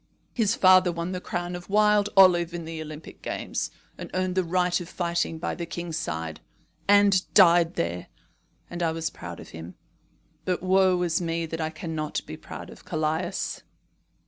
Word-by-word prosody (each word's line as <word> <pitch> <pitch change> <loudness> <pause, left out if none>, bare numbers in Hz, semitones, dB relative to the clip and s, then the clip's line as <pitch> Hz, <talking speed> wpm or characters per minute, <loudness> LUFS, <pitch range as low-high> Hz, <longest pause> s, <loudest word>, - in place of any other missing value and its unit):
His 225 -2 +1
father 185 -1 +6
won 170 +1 -4
the 180 -1 -4
crown 175 0 -3
of 175 +1 -9
wild 210 0 +4
olive 175 -3 +6
in 170 -1 -5
the 160 -1 -6
Olympic 155 0 -9
games, - - -3 0.3
and - - -7
earned 185 0 0
the 185 0 +1
right 180 +1 +1
of 175 - -8
fighting 170 -2 -1
by 165 - -3
the 170 -1 -5
king's 170 -1 -4
side, 80 - -4 0.5
and 200 -2 +4
died 175 -3 +6
there; 85 +1 -2 0.6
and 175 0 -6
I 165 -1 +1
was 160 0 -3
proud - - -8
of - - -11
him. 80 +2 -9 0.7
But 180 -1 -1
woe 185 -1 +4
is 170 0 0
me 165 -1 -1
that 165 0 -5
I 155 - -1
cannot 155 -1 -4
be - - -7
proud - - -9
of - - -14
Callias." 155 0 -2
175 Hz, 175 wpm, -26 LUFS, 160-185 Hz, 0.7 s, father